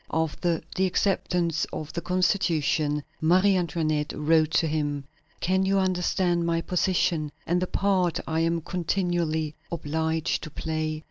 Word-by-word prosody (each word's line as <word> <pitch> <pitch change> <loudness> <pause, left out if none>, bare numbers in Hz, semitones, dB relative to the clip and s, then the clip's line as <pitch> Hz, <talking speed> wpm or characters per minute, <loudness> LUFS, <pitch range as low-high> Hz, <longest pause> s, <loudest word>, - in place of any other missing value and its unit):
After 160 +1 0 0.2
the 190 0 +2
acceptance 180 -3 0
of 155 -1 -6
the 170 - -3
Constitution, 165 -5 +1 0.2
Marie 185 +5 +4
Antoinette 155 -4 0
wrote 155 +1 +3
to - - +3
him: 145 -2 -1 0.4
"Can 190 +2 +2
you 195 +1 +2
understand 180 -2 +1
my 170 0 +1
position 170 -4 0
and 175 +1 +1
the 185 - 0
part 185 -4 +1
I 160 0 -1
am 165 0 +1
continually 170 -3 -1 0.2
obliged 160 0 -1
to 155 - -7
play? 155 0 -3
165 Hz, 135 wpm, -26 LUFS, 155-180 Hz, 0.4 s, Marie